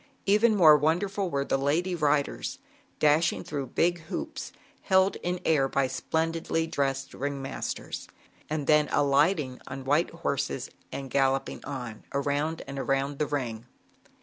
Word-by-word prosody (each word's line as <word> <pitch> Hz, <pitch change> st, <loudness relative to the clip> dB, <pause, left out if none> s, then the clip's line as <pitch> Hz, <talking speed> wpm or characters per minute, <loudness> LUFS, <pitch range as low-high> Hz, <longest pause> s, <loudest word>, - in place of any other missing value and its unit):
Even 215 Hz, +3 st, +4 dB
more 160 Hz, -6 st, +8 dB
wonderful 185 Hz, +6 st, 0 dB
were 140 Hz, -3 st, -1 dB
the 135 Hz, -, 0 dB
lady 160 Hz, +7 st, +1 dB
riders, 150 Hz, -3 st, 0 dB, 0.4 s
dashing 155 Hz, +2 st, +3 dB
through 140 Hz, -3 st, -4 dB
big 175 Hz, +7 st, +1 dB
hoops -, -, -5 dB, 0.3 s
held 190 Hz, 0 st, +3 dB
air 160 Hz, -6 st, +1 dB
by 140 Hz, 0 st, +2 dB
splendidly 160 Hz, +4 st, -1 dB
dressed 135 Hz, -4 st, -2 dB
ring 140 Hz, +1 st, -3 dB
masters 135 Hz, 0 st, -5 dB, 0.4 s
d 155 Hz, -, -1 dB
then 150 Hz, +1 st, +4 dB
alighting 145 Hz, -1 st, +2 dB
on 130 Hz, 0 st, -7 dB
white 145 Hz, +5 st, +2 dB
horses 140 Hz, -5 st, -3 dB, 0.2 s
and 135 Hz, -2 st, -6 dB
galloping 135 Hz, 0 st, +1 dB
on, 125 Hz, -6 st, -6 dB
around 145 Hz, +3 st, -1 dB
and 140 Hz, 0 st, -6 dB
around 135 Hz, +1 st, -1 dB
the 150 Hz, -, +1 dB
ring. 120 Hz, -5 st, -3 dB
145 Hz, 135 wpm, -28 LUFS, 135-165 Hz, 0.4 s, more